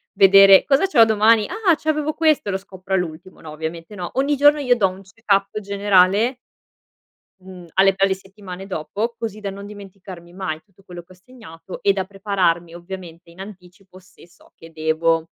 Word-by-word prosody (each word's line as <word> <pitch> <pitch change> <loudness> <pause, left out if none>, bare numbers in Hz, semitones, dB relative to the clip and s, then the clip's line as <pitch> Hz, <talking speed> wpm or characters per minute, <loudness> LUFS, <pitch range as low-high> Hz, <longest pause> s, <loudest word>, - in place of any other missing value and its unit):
vedere 195 0 +7
"Cosa 280 +6 +2
c'ho 265 -12 +5
domani? 220 0 +3
Ah! 375 -3 +1
C'avevo 310 0 -2
questo!" 310 -9 +1
E - - -1
lo 190 - -1
scopro 190 -1 -9
all'ultimo, 180 0 -4
no, 160 - -11
ovviamente, 165 +5 -7
no, 180 -3 -6
ogni 275 +3 0
giorno 290 +2 +5
io 250 -3 +2
do 210 -5 +2
un 185 +1 -12
check 195 +3 -23
up 195 +2 -1
generale 200 +3 +2 1.0
mhmm, 185 -2 -13
alle 195 +1 +4
pe 195 - -1
alle 195 - 0
settimane 195 -1 -11
dopo, 205 +6 -4
così 220 -2 -6
da 205 -2 -5
non 200 +1 -9
dimenticarmi 195 -4 -12
mai 175 -4 -5
tutto 195 -1 -27
quello 175 -2 -10
che 175 +2 -19
ho - - -20
segnato, 185 -5 -13
e 200 - +3
da 190 -1 -3
prepararmi, 185 -4 -1
ovviamente, 175 -1 -10
in 170 - -19
anticipo 185 -1 -13
se 190 -2 -20
so 170 - -24
che 165 - -15
devo, 160 +1 0
195 Hz, 190 wpm, -20 LUFS, 180-215 Hz, 1.0 s, vedere